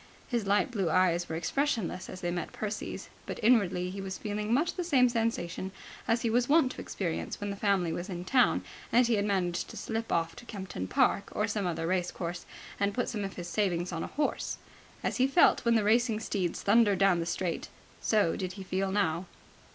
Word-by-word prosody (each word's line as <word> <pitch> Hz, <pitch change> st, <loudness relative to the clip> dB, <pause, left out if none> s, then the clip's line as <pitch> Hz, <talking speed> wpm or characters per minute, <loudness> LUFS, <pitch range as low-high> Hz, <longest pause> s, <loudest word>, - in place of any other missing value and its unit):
His 235 Hz, -5 st, -1 dB
light 205 Hz, +6 st, +2 dB
blue 195 Hz, -7 st, 0 dB
eyes 175 Hz, 0 st, +2 dB
were 160 Hz, -, -2 dB
expressionless 220 Hz, -, -1 dB
as 185 Hz, -, -8 dB
they 175 Hz, -, -1 dB
met 175 Hz, -2 st, -3 dB
Percy's, 210 Hz, 0 st, -4 dB, 0.2 s
but -, -, -5 dB
inwardly 190 Hz, -6 st, +3 dB
he 195 Hz, +1 st, -5 dB
was 190 Hz, -1 st, -5 dB
feeling 210 Hz, +1 st, -3 dB
much 285 Hz, +8 st, +2 dB
the 360 Hz, -, -3 dB
same 265 Hz, -7 st, +4 dB
sensation 225 Hz, -6 st, -1 dB, 0.4 s
as 230 Hz, 0 st, +2 dB
he 230 Hz, -, +2 dB
was 245 Hz, +2 st, +2 dB
wont 295 Hz, -4 st, +5 dB
to -, -, -7 dB
experience 170 Hz, -5 st, -3 dB
when 205 Hz, 0 st, -3 dB
the -, -, -4 dB
family 195 Hz, -5 st, +1 dB
was 175 Hz, +3 st, -4 dB
in 175 Hz, -1 st, -5 dB
town 250 Hz, +5 st, +3 dB, 0.3 s
and 245 Hz, +1 st, +5 dB
he 235 Hz, -, +2 dB
had 205 Hz, -2 st, +2 dB
managed 180 Hz, -4 st, 0 dB
to -, -, -9 dB
slip 225 Hz, 0 st, -3 dB
off 165 Hz, 0 st, 0 dB
to 245 Hz, -, -10 dB
Kempton 190 Hz, -, -5 dB
Park 200 Hz, -, +2 dB
or 210 Hz, -, 0 dB
some 205 Hz, -3 st, -1 dB
other 165 Hz, -1 st, -2 dB
race 180 Hz, 0 st, 0 dB
course 175 Hz, 0 st, -5 dB, 0.3 s
and 200 Hz, 0 st, +1 dB
put 245 Hz, -, 0 dB
some 215 Hz, -4 st, -3 dB
of 195 Hz, 0 st, -5 dB
his 175 Hz, -1 st, -6 dB
savings 180 Hz, -2 st, 0 dB
on 165 Hz, -1 st, -3 dB
a -, -, -3 dB
horse. 295 Hz, +1 st, -2 dB, 0.5 s
As -, -, -1 dB
he 260 Hz, 0 st, +4 dB
felt 275 Hz, +6 st, +5 dB
when 235 Hz, 0 st, +4 dB
the 220 Hz, -, +3 dB
racing 225 Hz, +1 st, +3 dB
steeds 190 Hz, -5 st, -2 dB
thundered 205 Hz, -1 st, +4 dB
down 195 Hz, -2 st, +4 dB
the 165 Hz, -, -2 dB
straight, 175 Hz, -1 st, -2 dB, 0.3 s
so 210 Hz, -7 st, +2 dB
did 185 Hz, -1 st, -4 dB
he 195 Hz, 0 st, -8 dB
feel 190 Hz, +1 st, -1 dB
now. 180 Hz, -3 st, 0 dB
200 Hz, 215 wpm, -30 LUFS, 180-230 Hz, 0.5 s, wont